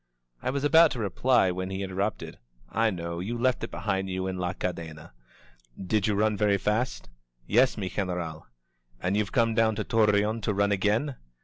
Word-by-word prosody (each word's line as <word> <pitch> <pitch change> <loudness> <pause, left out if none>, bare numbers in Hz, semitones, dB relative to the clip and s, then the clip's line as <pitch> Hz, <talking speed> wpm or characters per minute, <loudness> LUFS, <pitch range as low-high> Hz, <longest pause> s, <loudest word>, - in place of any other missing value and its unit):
I - - -2
was 140 +1 -2
about 160 +2 +6
to 125 - -5
reply 105 0 +2
when 95 +1 -4
he 95 +1 -3
interrupted: 95 +2 -3 0.3
"I 110 +2 +2
know. 85 -3 -4
You 110 +7 -3
left 130 +1 +1
it - - -3
behind 95 -2 -2
you 95 0 -2
in 95 -1 -3
La 90 0 -1
Cadena. 80 -4 -5 0.7
Did 100 +2 0
you 105 - +1
run 105 +1 +2
very 100 -1 +2
fast?" 110 +6 -1 0.4
"Yes, 125 - +3
mi 100 -3 -3
General. 90 -5 -4 0.5
"And 90 +2 -1
you've 105 -1 0
come 115 -3 +2
down 110 -1 +2
to 105 - -2
Torreon 105 0 +2
to 105 0 -1
run 100 +1 +2
again?" 105 +7 0
105 Hz, 185 wpm, -27 LUFS, 95-115 Hz, 0.7 s, about